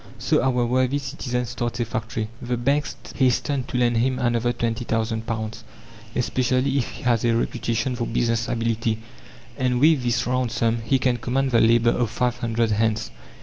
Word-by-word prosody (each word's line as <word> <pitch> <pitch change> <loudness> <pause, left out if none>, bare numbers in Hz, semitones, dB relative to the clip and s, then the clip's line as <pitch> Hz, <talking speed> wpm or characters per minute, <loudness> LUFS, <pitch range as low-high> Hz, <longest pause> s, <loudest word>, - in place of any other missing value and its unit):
So - - +2
our 125 -2 +2
worthy 130 +3 +1
citizen 130 -3 -3
starts 120 0 -3
a 120 - +1
factory. 110 -1 -3
The 120 0 -2
banks 140 +5 0 0.2
hasten 130 +1 +1
to 125 - -3
lend 120 -1 +2
him 130 +2 +1
another 120 -1 +1
£20,000, 115 -1 -2 0.5
especially 130 +2 +1
if 120 - -2
he - - -10
has 120 -3 +2
a 115 -1 +3
reputation 115 +1 -1
for 120 -1 -2
"business 115 -1 0
ability"; 115 -1 0 0.6
and 125 -1 +1
with 155 0 +5
this 120 0 0
round 125 -1 0
sum 115 0 0
he 135 +4 +2
can 125 -1 +1
command 130 +3 -1
the 115 - +4
labour 115 +1 +4
of 120 -3 0
five 125 +2 0
hundred 115 -2 0
hands. 110 +1 0
120 Hz, 170 wpm, -23 LUFS, 115-125 Hz, 0.6 s, with